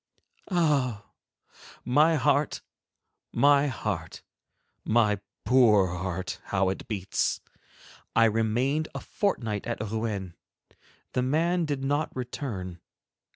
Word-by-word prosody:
Ah! 145 - +1 0.8
My 150 +6 +4
heart, 145 +1 +1 0.7
my 140 +3 +4
heart, 105 - -4 0.6
my 110 -3 +2 0.3
poor 105 -8 +4
heart, 90 0 -4
how 95 -1 +1
it 95 - -5
beats! 100 -4 -1 0.8
I 115 - +6
remained 120 +8 +1
a - - -2
fortnight 115 - -2
at 120 - -3
Rouen. 105 -4 -3 0.8
The 125 - +1
man 165 +6 +1
did 145 -3 -3
not 145 +3 0
return. 110 - -5
120 Hz, 100 wpm, -27 LUFS, 100-145 Hz, 0.8 s, I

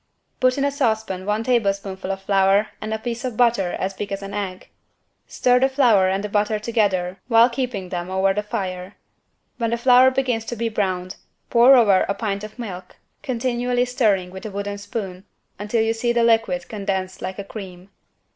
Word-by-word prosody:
Put 255 0 +2
in 280 - +1
a 285 - +1
saucepan 220 -8 -1
one 210 +2 0
tablespoonful 195 -5 -1
of 195 0 -5
flour 195 +1 +3
and 215 - -5
a 220 - 0
piece 235 +1 -5
of 250 -4 -4
butter 230 -7 +2
as 190 +1 -3
big 200 +1 -6
as 195 0 -4
an 195 0 -7
egg. 195 -3 -5 0.6
Stir 250 0 +2
the 265 +1 +3
flour 235 -9 +4
and 195 +1 -1
the - - -2
butter 210 +1 0
together 200 -5 0
while 235 0 +5
keeping 235 -7 -3
them 175 0 -4
over 190 +1 +2
the 210 - -1
fire. 190 -3 -5 0.6
When 230 -2 -1
the 235 - 0
flour 250 +1 +6
begins 255 -4 -1
to 240 - -4
be 230 0 -2
browned, 185 -4 -2 0.3
pour 245 +3 +7
over 205 -6 +4
a 200 - 0
pint 200 -2 -3
of 215 +2 -9
milk, 185 -6 -8 0.3
continually 245 -1 -1
stirring 210 -8 +1
with 190 +2 -9
a 220 - -5
wooden 200 0 -5
spoon 195 -3 -6 0.4
until 210 +2 0
you 225 0 +1
see 235 +1 -1
the 235 0 +2
liquid 230 +3 +2
condensed 195 -3 -4
like 185 0 -5
a 200 - -5
cream. 195 -3 -10
210 Hz, 195 wpm, -22 LUFS, 195-240 Hz, 0.6 s, pour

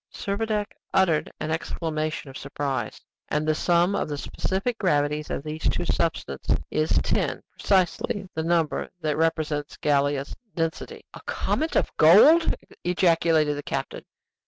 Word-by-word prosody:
Servadac 210 +1 -2 0.3
uttered 175 -5 +2
an 155 - -3
exclamation 155 -3 -3
of - - -16
surprise. 140 -1 -3 0.3
"And 150 +1 0
the 155 - +3
sum 175 +4 +2
of 165 - -1
the 145 - -3
specific 195 +10 -2
gravities 150 -4 +1
of - - -3
these 155 +1 -2
two 175 - -1
substances 165 - -1
is 155 +1 0
10, - - -1 0.2
precisely 190 +1 +1
the 160 - -2
number 165 -1 0
that 155 -2 0
represents 155 -2 -1
Gallia's 140 -1 0 0.2
density." 165 -2 -3
"A - - -10
comet 320 +1 -1
of - - +1
gold!" 250 - +7 0.3
ejaculated 165 -4 +3
the 145 - -4
captain. - - -4
160 Hz, 135 wpm, -25 LUFS, 150-180 Hz, 0.3 s, gold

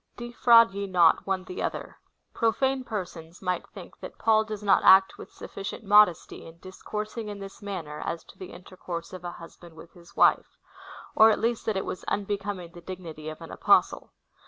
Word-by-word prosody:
5. 240 0 -7
Defi^QAid 230 -3 +6
ye 200 0 -4
not 175 -2 +3
one 190 -1 -1
the 185 - -7
other. - - -4 0.4
Profane 265 +3 0
persons 175 -7 -7
might 180 -1 -3
think - - -13
that - - -10
Paul 220 -1 +3
does 215 -1 -7
not 200 -1 +3
act 190 0 +6
with - - -11
sufficient 195 +3 -8
modesty 205 -4 +3
in 165 0 -14
dis 185 +2 -13
coursing 215 +1 -5
in 205 - -7
this 195 +1 -10
manner 175 -7 -6
as 165 -1 -4
to - - -19
the 185 - -9
intercourse 175 -1 -8
of 185 -1 -9
a 175 -1 -6
husband 170 0 -14
with 165 +1 -14
his 170 -1 -18
wife; - - +2 0.6
or 220 0 +7
at 215 - +2
least 230 0 -2
that 215 -3 0
it 190 - -3
was - - -6
unbecoming 200 -3 -4
the 175 - -13
dignity 165 -4 -8
of 155 - -10
an - - -10
Apostle. - - +2
190 Hz, 195 wpm, -26 LUFS, 175-210 Hz, 0.6 s, or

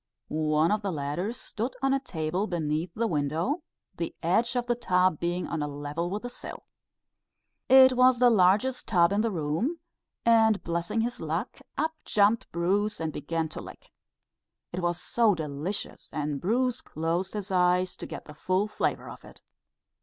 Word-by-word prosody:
One 155 +3 +3
of 210 0 +1
the 200 -2 -2
latter 150 +6 -2
stood 240 0 -5
on 270 0 +3
a 275 - +2
table 180 - -2
beneath 160 -1 -2
the 230 - 0
window, 165 - 0 0.4
the 170 - -4
edge 225 +9 +2
of 245 -1 0
the 240 - +1
tub 185 -8 +2
being 175 +1 -1
on 160 - -3
a 145 - -1
level 145 +4 -4
with 205 +4 -4
the - - -3
sill. - - -9 1.1
It 260 0 +8
was 255 0 +5
the 245 0 +5
largest 215 +6 +3
tub 175 -4 +4
in 205 +1 +2
the 230 - +1
room; 175 - -1 0.5
and 225 -2 +4
blessing 170 +6 -1
his 240 +2 -3
luck, - - -3 0.2
up 320 +1 0
jumped 210 +2 +2
Bruce 200 +5 0
and 160 -2 -3
began 160 +2 -2
to - - -7
lick. - - -12 0.8
It 180 - -2
was 175 -1 -1
so 225 -4 +2
delicious, 155 +5 -4
and 145 -2 -3
Bruce 245 +6 +1
closed 170 +5 -2
his 205 -1 -4
eyes 180 0 +2
to - - -7
get - - -8
the 150 - -11
full 185 +6 0
flavour 215 - -2
of - - -10
it. - - -15
185 Hz, 175 wpm, -28 LUFS, 165-230 Hz, 1.1 s, It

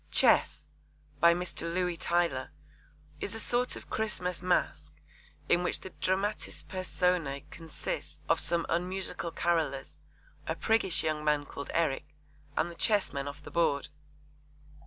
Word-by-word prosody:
Chess, 150 - +4 0.5
by 170 +1 +7
Mr. 175 -1 -3
Louis 180 0 0
Tylor, 170 -6 +1 0.7
is 210 - -4
a - - -4
sort 245 +2 +1
of - - -11
Christmas 180 -5 -1
masque 180 0 0 0.5
in 175 - +4
which 180 - 0
the 190 - -8
dramatis 195 +4 -1
personae 180 -6 0
consist 165 -2 -6
of - - +3
some 170 -1 +2
unmusical 180 0 -2
carollers, 160 -6 0 0.5
a - - 0
priggish 220 -6 +2
young 155 -1 0
man 150 -1 +2
called 140 - -7
Eric, 150 -3 0 0.4
and 175 - +1
the - - -11
chessmen 180 -9 +1
off 145 +1 -7
the - - -9
board. 145 -5 +2
170 Hz, 135 wpm, -31 LUFS, 150-185 Hz, 0.7 s, by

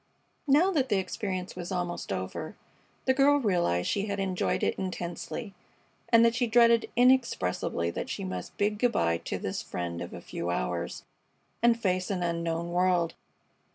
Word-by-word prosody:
Now 310 +8 +5
that 270 -7 +1
the 205 - +3
experience 185 -1 -3
was 180 +1 -6
almost 175 - -3
over, 95 -1 -4 0.5
the 260 - +4
girl 280 +2 +5
realized 175 - +1
that - - +1
she 200 0 0
had 200 -1 -2
enjoyed 190 -2 0
it - - +2
intensely, 185 +3 -5 0.6
and 230 0 +6
that 230 - +4
she 245 0 +1
dreaded 235 0 +5
inexpressibly 235 - +2
that - - -5
she - - -4
must 90 -1 -6
bid 205 0 0
good 245 0 +2
by 85 0 +1
to - - -4
this - - -3
friend 85 -1 -4
of 85 - -6
a 90 - -7
few 85 0 -5
hours 60 -9 -2 0.6
and 235 0 +4
face 185 -3 0
an 185 -3 -1
unknown 170 0 -2
world. 175 -2 +2
185 Hz, 170 wpm, -29 LUFS, 165-230 Hz, 0.6 s, and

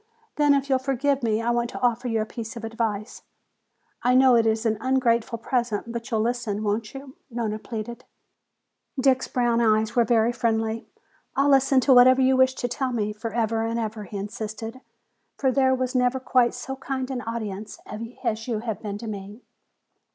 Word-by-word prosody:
Then 290 -1 +4
if 275 0 0
you'll 265 -2 +2
forgive 275 +1 0
me 225 -1 0
I 240 - +1
want 240 0 0
to - - -7
offer 245 0 +1
you 225 -2 0
a - - -1
piece 230 +2 -7
of 230 - -8
advice. 225 -1 -3 0.8
I 250 +1 +3
know 260 -1 +6
it 230 -1 +4
is 220 +1 0
an 220 -2 +1
ungrateful 240 -3 +1
present, 235 -2 -2
but 235 +1 -5
you'll 220 -3 +1
listen, 230 -3 -1
won't 215 +3 -2
you?" 270 0 -9
Nona 225 -3 -3
pleaded. 230 +1 -6 1.0
Dick's 260 0 +3
brown 240 -2 +1
eyes 215 -1 +2
were 240 - +5
very 230 0 +3
friendly. 225 -2 -1 0.5
"I'll 280 +1 +3
listen 270 -1 +4
to 265 - +5
whatever 255 +1 +7
you 265 0 +4
wish 260 0 +4
to 245 - -2
tell 255 +2 -2
me 210 -3 -1
forever 225 0 -1
and 230 +1 -1
ever," 215 -1 -4
he 200 +2 -7
insisted. 220 +3 -6 0.6
"For 265 -2 +2
there 260 0 +3
was 255 -1 -2
never 250 0 +2
quite 250 -2 +2
so 265 +2 -6
kind 270 -1 -4
an 250 -2 -3
audience 215 -3 -5
as 225 0 -4
you 225 -3 -2
have 225 -3 -4
been 205 -2 -4
to 230 +2 -8
me!" 205 +2 -7
235 Hz, 190 wpm, -25 LUFS, 220-255 Hz, 1.0 s, whatever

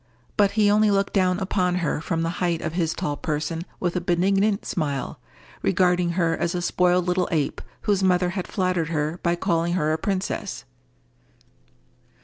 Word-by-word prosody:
But 200 -2 +3
he 205 -1 +5
only 215 +1 +4
looked 200 0 +1
down 185 -2 +2
upon 185 -2 0
her 165 -4 -1
from 165 0 -1
the 165 +1 -3
height 170 -2 +1
of 160 - -3
his 165 -2 0
tall 145 - -2
person 155 +3 -3
with 175 -1 -1
a 180 - 0
benignant 195 +4 +1
smile, 145 -5 -3 0.4
regarding 180 - +2
her 170 -2 +1
as 170 +1 -1
a 175 - -1
spoiled 180 0 +2
little 180 0 +1
ape 155 -4 -1 0.2
whose 205 -3 +1
mother 180 -1 +2
had 185 0 -4
flattered 180 -4 0
her 155 +1 -1
by 170 0 +1
calling 170 -1 0
her 155 -3 +1
a 160 - -1
princess. 190 - -3
180 Hz, 170 wpm, -24 LUFS, 165-185 Hz, 0.4 s, he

